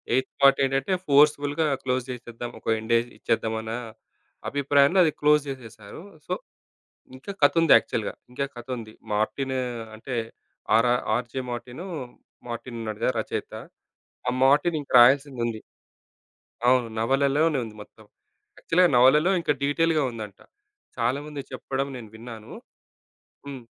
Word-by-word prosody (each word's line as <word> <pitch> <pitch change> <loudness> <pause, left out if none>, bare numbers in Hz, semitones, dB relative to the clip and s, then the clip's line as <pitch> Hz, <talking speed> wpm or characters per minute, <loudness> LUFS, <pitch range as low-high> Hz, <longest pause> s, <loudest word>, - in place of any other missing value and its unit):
Eighth 130 0 0
part 135 0 +6
ఏంటంటే, 135 +7 0
ఫోర్స్‌బుల్‌గా 145 +1 +3 0.2
close 130 -1 0
జేసేద్దాం, 120 -1 -7
ఒక - - -34 0.2
ఎండేజ్ 115 +1 +1
ఇచ్చేద్దాం 110 -1 -1
అన్న 110 0 -5 0.8
అభిప్రాయంలో 140 +5 +3
అది, 155 - +3
క్లోజ్ 150 0 +5
జేసేసేశారు. 115 -2 -9 0.3
సో, 180 - -1 0.8
ఇంకా 140 +10 -8
కతుంది 165 +3 +5
యాక్చువల్‌గా. - - -1 0.2
ఇంకా 140 +2 -2
కతుంది. 120 -3 -6 0.2
మార్టిను 130 +5 -1 0.4
అంటే, 125 +2 -5 0.6
ఆర 115 +2 +4 0.3
'ఆర్‌జే 125 +2 -4
మార్టిను,' 125 +10 -7 0.6
'మార్టిన్' 120 0 -6
ఉన్నాడుగా 110 +3 -1
రచయిత. 110 - -4 0.7
ఆ - - +4
'మార్టిన్' 150 +4 +4
ఇంక 140 - -12
రాయాల్సిదుంది. 120 -3 +3 1.1
అవును. 125 -2 +4
నవలలోనే 140 +5 +2
ఉంది 110 - -11
మొత్తం. 110 +1 -16 0.5
యాక్చుల్‌గా 180 +2 +3
నవలలో 150 +9 +5
ఇంకా 150 -3 +1
డీటెయిల్‌గా 155 +2 +2
ఉందంట. 105 -4 -8 0.6
చాలామంది 140 +5 -2
చెప్పడం 135 +1 -3
నేను 110 -4 -10
విన్నాను. 110 -1 -10 1.0
హ్మ్. 130 -4 -8
130 Hz, 115 wpm, -25 LUFS, 115-145 Hz, 1.1 s, part